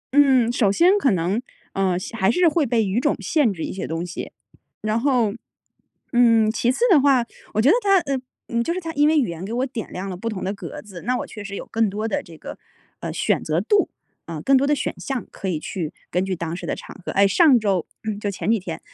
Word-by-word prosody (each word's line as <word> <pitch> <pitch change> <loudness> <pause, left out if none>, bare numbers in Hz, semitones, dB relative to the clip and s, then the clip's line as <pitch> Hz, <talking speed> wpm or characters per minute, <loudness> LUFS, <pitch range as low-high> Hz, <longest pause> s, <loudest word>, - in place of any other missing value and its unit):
嗯， 265 -5 +5
首 215 -5 +2
先 355 - +5
可 275 - +3
能， 190 +4 0 0.3
呃， 190 -2 +1 0.2
还 190 -4 +2
是 355 +7 +4
会 305 -3 +2
被 225 -2 +2
语 195 +5 0
种 290 +3 +1
限 295 -9 +2
制 170 -4 -5
一 - - -4
些 190 - -4
东 165 +2 -3
西。 175 - -6 0.5
然 215 +1 0
后， 245 -6 +2 0.8
嗯， 230 -3 +4
其 245 +2 +1
次 265 - -5
的 300 - +7
话， 265 -4 +4 0.3
我 - - +2
觉 255 - +3
得 390 - +6
它， 395 -1 +4
呃， 275 -4 -2 0.3
嗯， 235 0 0
就 335 - -2
是 370 - -2
它 330 -2 -6
因 295 +1 +3
为 315 0 +3
语 260 - +3
言 170 +2 -6
给 200 - -5
我 250 +2 0
点 240 -4 -6
亮 190 +2 -5
了 185 - -4
不 230 +6 -4
同 195 -4 -5
的 195 - -1
格 200 - -8
子， 190 -5 -10
那 250 +1 0
我 - - -4
确 210 -2 -9
实 200 0 -6
有 - - -6
更 225 -1 0
多 215 +3 -3
的 - - -1
这 165 -2 -14
个， - - -9 0.4
呃， - - -4
选 - - 0
择 155 +2 0
度， 400 - +2 0.4
呃， 165 -2 -5
更 275 - +4
多 275 +2 +3
的 295 - +3
选 265 - -2
项 265 -4 -3
可 195 - -6
以 165 -4 -1
去 165 -2 -4 0.2
根 180 +1 +1
据 190 -1 -2
当 170 0 -4
时 - - -7
的 - - -1
场 - - -11
合。 - - -3
哎， 200 0 +5
上 275 - +5
周 195 -5 0 0.2
嗯， 215 -2 -3
就 205 - -2
前 200 +2 -1
几 230 - +2
天， 170 -3 -6
225 Hz, 275 characters per minute, -22 LUFS, 190-270 Hz, 0.8 s, 的